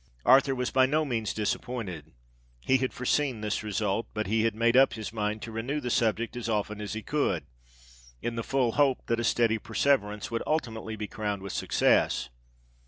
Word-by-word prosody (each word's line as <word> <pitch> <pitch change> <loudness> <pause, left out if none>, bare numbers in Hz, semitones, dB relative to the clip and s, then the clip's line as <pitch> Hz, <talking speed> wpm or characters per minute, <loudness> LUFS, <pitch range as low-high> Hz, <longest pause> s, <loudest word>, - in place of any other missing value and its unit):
Arthur 135 +2 +5
was 125 -1 -2
by 130 0 +4
no 155 +3 +1
means 115 -6 -1
disappointed: 100 -7 -3 0.5
he 130 - +3
had 130 0 -1
foreseen 130 -2 0
this 105 -1 -1
result—but 105 +1 -2
he 110 +2 +1
had 115 -2 +1
made 115 +2 +2
up 135 +1 +6
his 110 0 -6
mind 105 -1 -2
to 115 - -6
renew 120 +7 -2
the 125 -4 -3
subject 115 +1 +1
as 120 -1 -4
often 105 -1 -1
as 105 - -4
he 110 0 -5
could, 100 - 0 0.7
in 120 - -3
the 115 - -2
full 130 -3 +1
hope 140 0 +2
that 115 0 0
a - - -1
steady 115 -1 +2
perseverance 105 -5 0
would 115 - -1
ultimately 115 -7 -2
be 105 0 -4
crowned 105 -2 -4
with 100 - -5
success. - - +2
115 Hz, 185 wpm, -28 LUFS, 105-125 Hz, 0.7 s, up